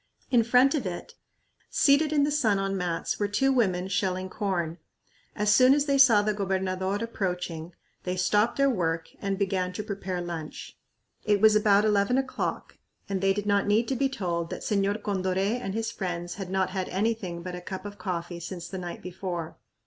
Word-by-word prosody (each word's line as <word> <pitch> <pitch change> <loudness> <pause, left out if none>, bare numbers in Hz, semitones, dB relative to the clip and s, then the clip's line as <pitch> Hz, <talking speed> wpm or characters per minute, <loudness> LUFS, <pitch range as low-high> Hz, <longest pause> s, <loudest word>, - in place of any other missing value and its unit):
In 245 -3 +5
front 250 +4 +4
of 270 -10 -1
it, 175 -1 -6 0.6
seated 290 +2 +4
in 295 -2 +3
the 290 - +1
sun 230 -9 +2
on 195 0 -1
mats, 175 -3 -2
were 205 - +1
two 270 +7 +2
women 185 -7 +1
shelling 185 -1 -1
corn. 175 -5 -2 0.6
As 210 0 +2
soon 255 +4 +6
as 290 -1 +1
they 280 -2 +2
saw 230 -6 +7
the 215 0 +1
gobernador 190 -1 -1
approaching, 180 -6 -3 0.3
they 180 0 -3
stopped 205 +5 +2
their 275 0 +4
work 165 -9 -1
and 195 -1 -1
began 190 -2 0
to 210 - -4
prepare 195 -3 -4
lunch. 170 -3 -6 0.5
It 205 -1 +2
was 215 +1 +6
about 210 -1 +4
eleven 210 +3 +2
o'clock 265 -1 -3 0.3
and 195 -2 -2
they 195 0 +3
did 205 +1 -2
not 200 -1 +2
need 220 +3 +3
to 270 - 0
be 270 +2 +1
told 170 -9 -2
that - - -6
Señor 205 +1 0
Condoré 195 +3 0
and 195 -3 -4
his 225 0 -2
friends 175 -4 -4
had 195 -2 -6
not 190 0 0
had 185 -1 -3
anything 190 -4 -2
but 180 0 -5
a 180 - -6
cup 190 +2 -7
of 205 -1 -8
coffee 175 -2 -4
since 175 0 -6
the 190 +1 -6
night 175 -1 -7
before. 180 -2 -5
195 Hz, 195 wpm, -27 LUFS, 180-215 Hz, 0.6 s, saw